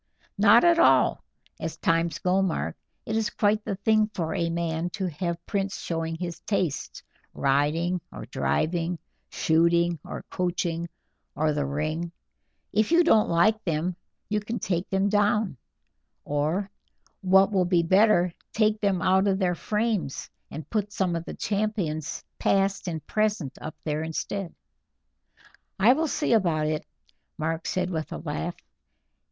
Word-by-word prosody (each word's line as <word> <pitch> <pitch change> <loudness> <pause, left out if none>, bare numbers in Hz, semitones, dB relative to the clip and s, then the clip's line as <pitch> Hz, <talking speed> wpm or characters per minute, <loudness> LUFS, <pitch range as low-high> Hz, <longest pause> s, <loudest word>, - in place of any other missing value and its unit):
"Not 215 +3 +7
at 340 -1 +5
all, - - +4 0.4
as 160 - -4
times 165 -1 +1
go, 185 +3 +1
Mark; 190 -4 -1 0.3
it 220 - -2
is 220 -1 +1
quite 210 0 +1
the 200 - -3
thing 215 +2 +2
for 160 -3 -2
a 170 -1 0
man 165 0 -1
to 190 - -1
have 170 +1 -4
prints 195 -2 -2
showing 165 -1 -3
his 170 -1 -5
tastes, 180 -8 -2 0.3
riding 155 +6 +1
or - - -8
driving, 170 +2 -1 0.3
shooting 170 +1 +2
or - - -7
coaching, 170 -2 -2 0.5
or 155 +1 +1
the 145 -1 -1
ring. 155 +4 -2 0.6
If 215 +7 +2
you 340 +1 +6
don't 220 -10 +4
like 215 +6 +3
them 170 +1 -1 0.3
you 210 0 0
can 220 +3 -4
take 175 -3 -2
them 195 +1 +1
down, 205 -2 +2 0.7
or, 155 +7 -1 0.5
what 190 +1 +5
will 190 -3 +2
be 175 -1 +3
better, 185 -1 +4 0.2
take 215 -1 +2
them 195 -4 +1
out 190 +2 +3
of 195 -1 +2
their 185 -2 +1
frames 210 -5 -2 0.2
and 155 - -7
put 210 -2 -1
some 185 -3 0
of 165 0 -4
the - - -7
champions 200 -8 -2 0.2
past 195 0 +1
and 160 -3 -4
present 210 -10 -1
up 155 - -6
there 150 0 -1
instead." 165 +3 -4 1.2
"I 215 +5 +6
will 320 +3 0
see 295 -3 0
about 170 -8 +2
it," 155 0 -2 0.5
Mark 160 +1 -2
said 185 0 -1
with 160 -2 -3
a - - -4
laugh. 160 +2 -4
180 Hz, 150 wpm, -26 LUFS, 165-205 Hz, 1.2 s, Not